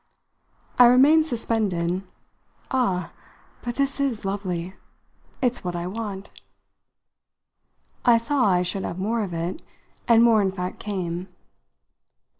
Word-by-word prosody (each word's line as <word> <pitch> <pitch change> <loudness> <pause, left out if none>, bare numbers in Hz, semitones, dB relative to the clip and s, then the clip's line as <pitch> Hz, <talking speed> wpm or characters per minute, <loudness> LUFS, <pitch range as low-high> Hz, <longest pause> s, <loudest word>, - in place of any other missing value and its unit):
I 245 - +10
remained 290 +6 +5
suspended. 195 - -1 0.7
"Ah, 190 -10 0 0.5
but 240 -1 -4
this 275 0 -1
is 255 -7 -1
lovely! 185 -3 -3 0.7
It's 250 -1 0
what 180 -1 -3
I 170 0 -3
want." 200 0 -6 1.7
I 240 -1 +6
saw 250 +3 +1
I 180 -2 +3
should 190 +2 -1
have 170 - -4
more 220 +5 -1
of 190 - -5
it, 170 - -4 0.5
and 230 -1 +6
more 230 -2 +5
in 195 -1 +1
fact 180 -1 -5
came. 185 -3 -4
205 Hz, 120 wpm, -24 LUFS, 180-240 Hz, 1.7 s, I